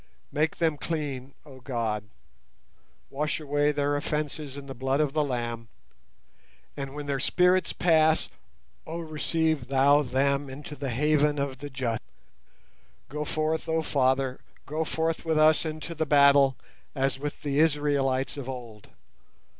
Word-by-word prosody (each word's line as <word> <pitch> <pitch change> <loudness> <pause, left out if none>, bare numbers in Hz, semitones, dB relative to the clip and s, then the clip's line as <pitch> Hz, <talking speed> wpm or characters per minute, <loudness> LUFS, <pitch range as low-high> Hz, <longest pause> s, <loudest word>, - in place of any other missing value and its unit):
Make 155 +2 0
them 160 -3 +1
clean, 140 -5 -4
oh 135 -3 -13
God; 115 -5 -2 1.1
wash 150 +3 -1
away 145 0 +1
their 145 0 0
offences 150 -1 -3
in 140 - -8
the 135 - -7
blood 130 +2 0
of 150 -3 +1
the 155 -1 +2
Lamb; 120 -4 -3 1.1
and 135 0 -6
when 150 0 -5
their 140 -1 -1
spirits 180 +5 +3
pass, 160 -2 +3 0.6
oh 165 +2 -4
receive 155 -3 -1
Thou 140 +2 +5
them 140 +1 0
into 145 +2 -8
the 140 -1 -4
haven 150 +3 +2
of 140 -2 -2
the 145 +1 -6
just. 125 -4 -2 1.1
Go 150 +2 -3
forth, 155 +2 -1
oh 160 0 +1
Father, 130 -2 +1 0.3
go 155 +3 -2
forth 160 +1 -1
with 160 -2 0
us 155 +1 +5
into 155 +2 -5
the 160 -1 -2
battle, 140 -2 +6 0.4
as 135 -1 0
with 145 +1 -5
the 145 -1 0
Israelites 145 -4 +1
of 135 -2 -5
old. 120 -5 -8
145 Hz, 145 wpm, -27 LUFS, 135-155 Hz, 1.1 s, battle